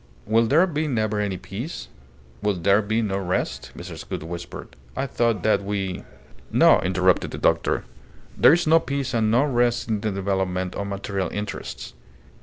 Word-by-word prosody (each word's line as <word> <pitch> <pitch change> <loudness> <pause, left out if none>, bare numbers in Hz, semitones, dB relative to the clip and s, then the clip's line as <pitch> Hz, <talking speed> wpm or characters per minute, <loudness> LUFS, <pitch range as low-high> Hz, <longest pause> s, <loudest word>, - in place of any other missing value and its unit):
"Will 115 +2 +3
there 160 +9 +5
be 155 -3 -2
never 110 -5 0
any 100 -3 -1
peace? 110 - -6 0.5
Will 105 -1 +1
there 100 +4 +3
be 110 +2 0
no 100 -2 -1
rest?" 90 -1 -2
Mrs. - - -8
Gould - - -4
whispered. 85 +1 -8 0.2
"I 135 - -1
thought 115 -6 0
that 105 -2 +2
we 100 -2 -3 0.2
" - - -25
"No!" - - +6
interrupted 90 -1 +2
the - - -6
doctor. - - +1 0.5
"There - - +6
is 175 +1 +2
no 160 +1 +6
peace 140 -4 -3
and 110 -2 +2
no 120 +5 +4
rest 120 -4 +1
in 105 -2 0
the 110 - -1
development 95 -2 -1
of 100 - -4
material 100 -1 -3
interests. 105 -1 -6
105 Hz, 175 wpm, -24 LUFS, 95-120 Hz, 0.5 s, No